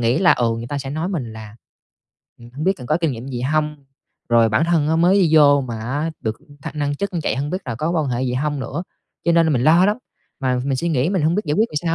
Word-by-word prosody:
nghĩ 120 +2 +2
là, 185 -2 +5
ừ, 120 -2 +1
người 115 +1 -6
ta 145 +1 -3
sẽ 135 -1 -6
nói 160 +5 -2
mình 130 - -4
là 110 0 -10 0.8
"Ừm, 120 0 -14
hổng 150 +4 -4
biết 190 - +4
cần 125 - -9
có 155 - +3
kinh 160 -5 +1
nghiệm 120 +2 -7
gì 125 -2 -4
hông?", 150 +3 0 0.5
rồi 115 -1 +4
"Bản 110 +9 +2
thân 165 -3 +2
á 160 - +2
mới 175 +3 +4
đi 165 - +3
vô 145 -2 +6
mà 120 -3 -5
á 145 +8 -2
được 110 -1 -3 0.2
thăng - - -6
nâng 145 0 0
chức 200 +4 -3
như 170 - -1
vậy, - - -1
hông 145 +3 -2
biết 185 - -1
là 120 -3 -4
có 155 +7 -2
quan 160 -4 0
hệ 125 +1 -1
gì 125 -1 -1
hông 145 +1 -1
nữa?" 140 +7 -4 0.4
Cho 170 - +3
nên 165 -1 +4
là 160 - +2
mình 120 - +1
lo 170 +4 +6
lắm, 210 - +1 0.4
mà 130 -2 0
mình 135 -1 0
suy 170 +6 -1
nghĩ 145 0 +1
mình 185 -6 0
hông 160 +2 +2
biết 210 - 0
giải 150 - 0
quyết 220 +6 +2
làm - - -7
sao 165 -1 0
145 Hz, 295 wpm, -20 LUFS, 125-165 Hz, 0.8 s, vô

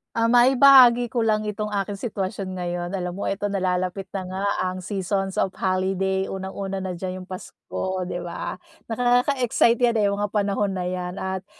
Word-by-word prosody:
Ah, 230 0 +2
maibahagi 245 0 +7
ko 240 0 -2
lang 215 -1 +1
itong 210 0 -3
aking 205 0 -2
sitwasyon 195 -3 -4
ngayon. 175 0 -3
Alam 180 -1 -3
mo 200 - -3
eto 200 +1 -2
nalalapit 185 -1 -1
na 190 -1 -5
nga 190 +2 -4 0.2
ang 185 0 -3
seasons 195 0 -2
of 190 - +1
holiday, 190 0 0
unang-una 195 0 -5
na 185 -2 -4
diyan 185 0 -5
'yong 185 - -13
Pasko, 185 0 -5
'di - - -3
ba? 175 -1 -5 0.3
Nakaka-excite 245 0 +2
'yan, 240 -1 +3
eh, 205 - +3
mga 205 +1 -1
panahon 200 -1 0
na 185 - -3
'yan. 180 -1 -4
At 190 0 -3
195 Hz, 170 wpm, -24 LUFS, 185-215 Hz, 0.3 s, maibahagi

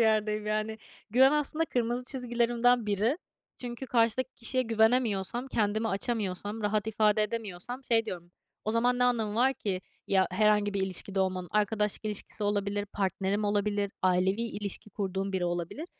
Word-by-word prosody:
yerdeyim, 215 -1 +2
yani. 215 +1 -1 0.3
Güven, 260 +5 +6
aslında, 300 +2 +1
kırmızı 245 -3 -1
çizgilerimden 240 -2 +1
biri. 215 - +1 0.4
Çünkü 245 +1 -6
karşıdaki 240 +2 +2
kişiye 255 +2 -1
güvenemiyorsam, 225 0 +1
kendimi 215 -1 0
açamıyorsam, 205 0 -2
rahat 210 0 0
ifade 215 -1 +3
edemiyorsam 225 +3 -5
şey 225 -2 +2
diyorum, 175 -1 -6 0.3
o 215 - 0
zaman 245 +2 +2
ne 250 - +4
anlamı 225 -4 +1
var 260 +4 +3
ki 190 -6 -3 0.3
ya, 190 -1 +3
herhangi 210 +1 +3
bir 200 - 0
ilişkide 190 +1 -2
olmamın, 185 -1 -1
arkadaşlık 210 0 +1
ilişkisi 210 0 -4
olabilir, 205 0 0
partnerim 195 +1 0
olabilir, 205 -1 0
ailevi 185 +4 +2
ilişki 210 -2 -4
kurduğum 195 -1 -2
biri 185 -2 0
olabilir. 175 - -3
215 Hz, 145 wpm, -29 LUFS, 200-235 Hz, 0.4 s, Güven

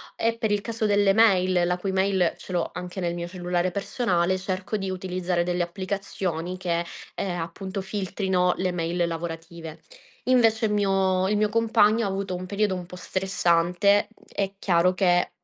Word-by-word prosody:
e 230 0 0
per 220 -2 -1
il 205 -1 +1
caso 225 -1 -3
delle 205 -1 +4
mail, 185 -5 +4
la 180 +1 0
cui 195 +1 -2
mail 190 -2 +2
ce - - -11
l'ho 175 -2 0
anche 180 +2 -6
nel 175 -1 -1
mio 170 0 -4
cellulare 180 0 -1
personale, 185 -3 0
cerco 185 +2 -3
di 195 -1 -3
utilizzare 185 -1 -2
delle 175 0 0
applicazioni 185 -1 -3
che, 170 -2 -1 0.3
ehm, 175 -2 -2
appunto 190 +4 -5
filtrino 190 -2 0
le 185 -1 0
mail 170 0 -1
lavorative. 165 -1 -6 0.5
Invece 230 -3 +4
il 210 - 0
mio 190 -2 +2
il 210 - +2
mio 210 0 +2
compagno, 225 0 +3
ha - - -1
avuto 195 -1 -3
un 180 +1 -5
periodo 205 -1 0
un 180 -1 -5
po' 180 - -10
stressante; 185 +2 +2
mhmm, 225 - -25
è 195 -1 -1
chiaro 180 -2 +3
che 175 -1 +3
185 Hz, 175 wpm, -25 LUFS, 175-200 Hz, 0.5 s, delle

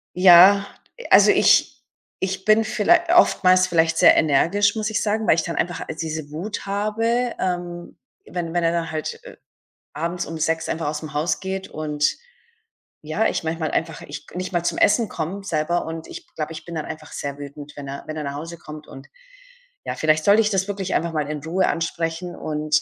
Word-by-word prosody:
Ja, 185 +2 +7 0.4
also, - - +7
ich - - +4 0.5
ich 190 0 -2
bin 215 +1 +4
viellei 220 +10 +3 0.2
oftmals 185 - +5
vielleicht 165 -2 +2
sehr - - +7
energisch, 170 +7 +3
muss 215 0 -2
ich 220 - -1
sagen, 215 +1 -1
weil - - +5
ich 165 - +1
dann 170 - -5
einfach 175 0 -2
al - - -4
diese 155 -2 -5
Wut 185 +9 -5
habe, 225 +4 -1
ähm, 175 -1 -4 0.3
wenn 170 -2 -5
wenn 175 0 0
er 165 - +2
dann 170 -1 -2
halt, 155 -1 -4
äh, - - -12 0.6
abends 170 +3 -3
um 165 0 -6
18:00 160 0 -1
einfach 165 -1 -2
aus'm 150 0 -5
Haus 155 +4 0
geht 190 0 -5
und 150 -1 -3 1.0
ja, 155 +8 -1
ich - - -2
manchmal 160 -1 -2
einfach 160 -1 -2
ich 145 0 -9
k - - -15
nicht 185 0 -4
mal 175 -2 -1
zum - - -1
Essen 225 +2 +3
komme 175 +5 -5
selber 170 -1 -1
und 160 0 -7
ich - - -10
glaube, 155 0 -4
ich 160 0 -9
bin 170 - -8
dann 155 - -3
einfach 155 -1 -9
sehr 140 0 -5
wütend, 145 +1 -9
wenn 140 -1 -7
er 140 +1 -7
wenn 155 - -5
er 155 - -3
nach 140 0 -5
Hause 165 +3 -7
kommt. 150 -1 -11
Und 135 +1 -12 0.8
ja, - - -3
vielleicht 155 0 +1
sollte 205 +2 +6
ich 210 - +1
das 190 -1 0
wirklich 195 -2 -3
einfach 170 0 -1
mal 150 -2 -2
in 150 -1 -3
Ruhe 180 +4 0
ansprechen 165 +1 -3
und, 150 0 -1
165 Hz, 205 wpm, -22 LUFS, 155-190 Hz, 1.0 s, Ja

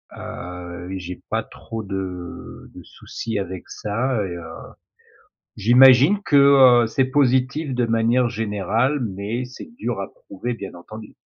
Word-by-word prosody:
Heu, 90 0 -8
j'ai 90 0 -8
pas - - 0
trop 115 0 -8
de 95 -3 -7
de - - -11
soucis 115 -3 -6
avec 95 -2 -5
ça 115 +1 -2
et 85 -2 -5
heu, 85 - -8 1.1
j'imagine 130 - +6
que, 145 - +2 0.5
heu, - - -1
c'est 135 +4 +1
positif 130 +1 +1
de 125 -1 +1
manière 115 +2 +2
générale, 110 +5 -1
mais 105 +6 -3
c'est 125 - -11
dur - - -3
à - - -4
prouver 295 - -6
bien 100 -4 -8
entendu. 110 +5 -11
115 Hz, 140 wpm, -22 LUFS, 95-130 Hz, 1.1 s, j'imagine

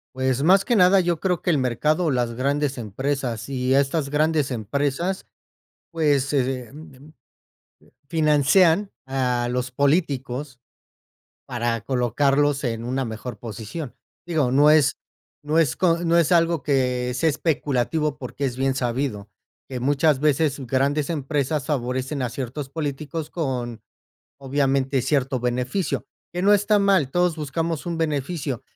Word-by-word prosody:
Pues 130 +1 0
más 190 +3 +5
que 240 - +2
nada, 190 -1 +6
yo 175 -3 0
creo 180 -3 0
que 175 - +1
el 155 - +2
mercado 140 +6 +1
o 155 - +2
las 120 -2 0
grandes 140 +3 -1
empresas 120 +1 -3
y 130 -1 0
estas 140 +1 +1
grandes 150 -1 +1
empresas, 140 - -2 0.6
pues, 145 -4 +1
eh, 130 -3 -1
mm, 145 - -12 0.3
mm, 155 - -17 0.7
eh, - - -29
financian 160 +5 +3 0.2
a 125 -2 0
los 125 0 -2
políticos 140 -2 -1 0.9
para 120 -2 -1
colocarlos 140 +4 +1
en 115 -3 -2
una 130 +1 -1
mejor 115 +2 -7
posición. 115 - -7 0.3
Digo, 155 -7 +1
no 145 +3 +5
es 155 -3 +4 0.5
no 150 +2 0
es 145 -7 +3
co 170 +2 +2
no 165 - +2
es 170 +1 +1
algo 165 -3 +3
que 125 -3 0
sea 145 +6 +1
especulativo, 150 0 -1
porque 135 +2 -4
es 125 -2 -2
bien 135 0 0
sabido 125 -4 -2 0.4
que 130 -2 -5
muchas 145 +2 +2
veces 150 0 +2
s 135 - -6
grandes 140 +4 +1
empresas 145 -2 -1
favorecen 130 0 -2
a 125 - -1
ciertos 135 +3 -5
políticos 150 +1 -4
con, 125 - -3 0.6
obviamente, 135 -1 0
cierto 135 -1 0
beneficio, 125 +9 -1 0.3
que 180 - -2
no 200 - +4
está 205 +1 +3
mal. 190 -9 +2
Todos 175 -2 +1
buscamos 160 +2 -3
un 170 -1 -3
beneficio. 150 -4 -2
140 Hz, 145 wpm, -23 LUFS, 125-155 Hz, 0.9 s, nada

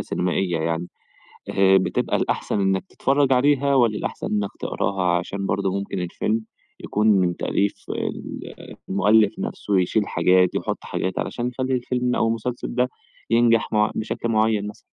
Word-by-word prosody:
سينمائية 90 -1 -1
يعني، 80 +2 -2 0.6
آآ، 95 0 +5
بتبقى 95 - 0
الأحسن 105 - -1
إنّك 95 -1 +1
تتفرج 135 0 +2
عليها 140 +1 +3
والّا 115 -5 +3
الأحسن - - -4
إنّك 105 -2 -1
تقراها؟ 90 -3 0
عشان 100 +3 -4
برضه 95 0 0
ممكن 100 -1 -4
الفيلم 105 +5 -1 0.4
يكون 105 +1 0
من 95 -5 +3
تأليف 100 0 -1
ال - - -4 0.5
المؤلف 105 +2 +3
نفسه، 100 -2 -1
يشيل 100 +3 +1
حاجات، 90 +1 +3
يحُط - - -2
حاجات، 95 0 -3
علشان 120 0 -2
يخَلّي 130 +1 -2
الفيلم 125 0 -1
أو - - +2
المسلسل 115 +2 -3
ده 125 0 +2 0.4
ينجح 115 0 +3
مع 105 0 +3
بشكل 110 +1 -3
معين 110 -2 +2
مثلًا. 105 - -9
105 Hz, 150 wpm, -23 LUFS, 95-120 Hz, 0.6 s, آآ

